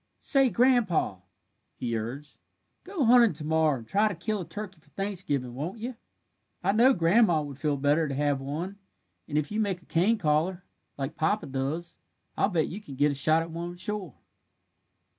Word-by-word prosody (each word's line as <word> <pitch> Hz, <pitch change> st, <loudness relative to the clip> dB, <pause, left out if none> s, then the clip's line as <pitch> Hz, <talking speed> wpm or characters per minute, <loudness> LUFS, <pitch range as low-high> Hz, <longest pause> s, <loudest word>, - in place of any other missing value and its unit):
"Say, 270 Hz, -3 st, +3 dB
Grandpa," 235 Hz, -, +2 dB, 0.6 s
he 120 Hz, -2 st, -3 dB
urged, 125 Hz, +7 st, -6 dB, 0.4 s
"go 365 Hz, -7 st, -1 dB
hunting 235 Hz, -3 st, +6 dB
to 150 Hz, -, -6 dB
morrow 160 Hz, -2 st, +2 dB
and 115 Hz, -2 st, -11 dB
try 205 Hz, -, +3 dB
to 205 Hz, -, -3 dB
kill 205 Hz, +4 st, -2 dB
a -, -, -6 dB
turkey 205 Hz, -4 st, -7 dB
for 150 Hz, -, -25 dB
Thanksgiving, 160 Hz, -9 st, -2 dB
won't 155 Hz, -, -4 dB
you? 240 Hz, +3 st, -5 dB, 0.7 s
I 190 Hz, -, +3 dB
know 235 Hz, +6 st, +5 dB
grandma 175 Hz, -2 st, +3 dB
would 140 Hz, -2 st, -8 dB
feel 150 Hz, -2 st, 0 dB
better 145 Hz, +3 st, +2 dB
to 135 Hz, -, -3 dB
have 145 Hz, -1 st, 0 dB
one, 170 Hz, +9 st, -5 dB, 0.5 s
and 150 Hz, -, -2 dB
if 150 Hz, +3 st, -1 dB
you 210 Hz, -, -1 dB
make 195 Hz, -5 st, -1 dB
a -, -, -23 dB
cane 190 Hz, +8 st, +2 dB
caller, 175 Hz, +2 st, 0 dB, 0.3 s
like 140 Hz, +2 st, -4 dB
papa 205 Hz, +7 st, 0 dB
does, 140 Hz, +6 st, -4 dB, 0.4 s
I'll -, -, +2 dB
bet 165 Hz, -5 st, +1 dB
you 200 Hz, +5 st, -7 dB
can 165 Hz, -10 st, -10 dB
get 145 Hz, +2 st, +3 dB
a -, -, -2 dB
shot 155 Hz, +4 st, +3 dB
at 165 Hz, -, -9 dB
one 170 Hz, +1 st, -5 dB
sure." 190 Hz, -, -5 dB
165 Hz, 185 wpm, -28 LUFS, 145-205 Hz, 0.7 s, hunting